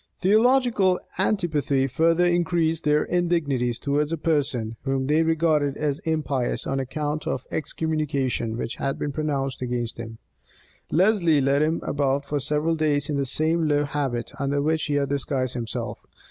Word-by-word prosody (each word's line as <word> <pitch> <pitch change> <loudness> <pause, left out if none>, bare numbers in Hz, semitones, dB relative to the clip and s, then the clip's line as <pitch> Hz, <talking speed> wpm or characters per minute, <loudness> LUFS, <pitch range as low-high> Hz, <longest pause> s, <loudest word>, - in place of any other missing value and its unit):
Theological 215 -2 +3 0.2
antipathy 155 -9 +1
further 165 +6 +2
increased 170 -2 +1
their 150 0 +3
indignities 150 -9 0
towards 145 +1 0
a 165 - -1
person, 140 -8 0
whom 135 -1 -1
they 150 +3 +3
regarded 155 -3 +1
as 150 -1 -1
impious 145 -6 -1
on 135 0 -1
account 150 +3 -3
of 130 - -2
the - - -5
excommunication 145 -8 -2
which 115 - -4
had 135 - -2
been 145 - -3
pronounced 140 -3 -2
against 120 -2 -3
him. 115 -1 -7 0.7
Lesley 175 -4 +3
led 140 +1 +2
him 160 +2 +1
about 140 0 0
for 145 +1 -1
several 150 +4 0
days 150 -2 0
in - - 0
the 140 -1 -1
same 160 +4 +1
low 145 -1 +2
habit 140 -5 -2
under 140 0 0
which 155 +2 +1
he 145 - -1
had 140 -1 +1
disguised 135 -2 -1
himself. 115 -3 -4
150 Hz, 160 wpm, -24 LUFS, 135-160 Hz, 0.7 s, Theological